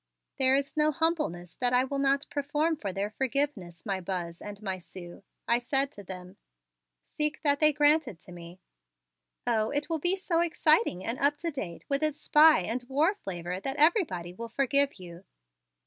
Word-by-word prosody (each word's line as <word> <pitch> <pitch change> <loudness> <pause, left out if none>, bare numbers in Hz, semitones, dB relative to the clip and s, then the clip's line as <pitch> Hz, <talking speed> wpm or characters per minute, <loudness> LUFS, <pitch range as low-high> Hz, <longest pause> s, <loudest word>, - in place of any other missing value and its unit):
"There 265 0 +4
is 275 0 -2
no 305 0 +3
humbleness 300 - -1
that 245 -1 +1
I 250 +1 +4
will 275 +1 -3
not 275 0 +2
perform 295 +3 0
for 205 -10 -5
their 200 +3 -3
forgiveness, 240 - -2
my 195 -2 -2
Buzz 175 -2 -5
and 205 -1 -8
my 190 -2 -3
Sue," 175 0 -11 0.3
I 235 +1 +4
said 270 +3 +1
to 205 - -11
them. 185 +1 -10 0.7
"Seek 300 +1 -2
that 285 -1 +2
they 305 -1 +5
grant 295 +1 +3
it 190 -9 -9
to - - -13
me." 175 +1 -11 0.8
"Oh, 220 -2 +1
it 290 +2 -2
will 325 - 0
be 355 +5 +1
so 360 -3 -1
exciting 310 - +2
and 235 +3 -3
up 290 +1 +2
to 335 +2 -3
date 185 - -7
with 280 0 0
its 305 -1 0
spy 305 -2 +5
and 235 +7 -3
war 305 +8 +2
flavor 180 - -6
that 270 +7 -3
everybody 295 - +2
will 230 +5 -8
forgive 280 +3 +2
you. 175 -1 -11
265 Hz, 185 wpm, -28 LUFS, 185-300 Hz, 0.8 s, they